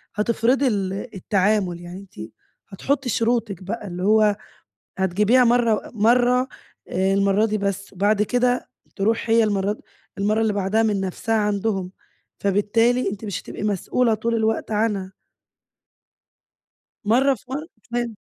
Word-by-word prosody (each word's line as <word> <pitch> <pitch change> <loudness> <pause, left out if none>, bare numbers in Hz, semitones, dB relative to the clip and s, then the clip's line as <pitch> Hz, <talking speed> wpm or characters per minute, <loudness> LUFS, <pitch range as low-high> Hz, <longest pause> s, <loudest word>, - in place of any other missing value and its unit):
هتفرضي 235 +5 +2
ال 195 -5 -1 0.2
التعامل 190 -2 0
يعني 175 +2 -8
أنتِ 115 - -10 0.4
هتحطي 270 +7 -1
شروطِك 230 -5 0
بقى، 210 +2 -5
اللي 180 0 -5
هو 210 0 +4 0.6
هتجيبيها 205 +7 +3
مرة 235 -2 +2
مرة 245 +3 +3 0.4
آآ 190 +1 +1
المرة 200 +2 +3
دي 215 -1 -1
بس، 200 -1 -3
وبعد 205 +2 +2
كده 245 +2 0 0.3
تروح 225 +3 0
هي 225 0 +5
المرة 205 0 0 0.4
المرة 210 +2 +1
اللي 220 -2 +1
بعدها 200 +3 +1
من 210 -3 +1
نفسها 195 +4 -2
عندهم، 205 -3 -1 0.5
فبالتالي 220 +5 +2
أنتِ 205 +2 -7
مش 200 -4 -4
هتبقي - - -7
مسؤولة 215 +4 +1
طول 230 +2 -1
الوقت 220 0 0
عنها. 210 -3 0 1.9
مرة 260 +6 +4
في 245 - -20
مرة، 295 +4 -4 0.2
تمام. 235 -1 -2
215 Hz, 130 wpm, -22 LUFS, 195-230 Hz, 1.9 s, هي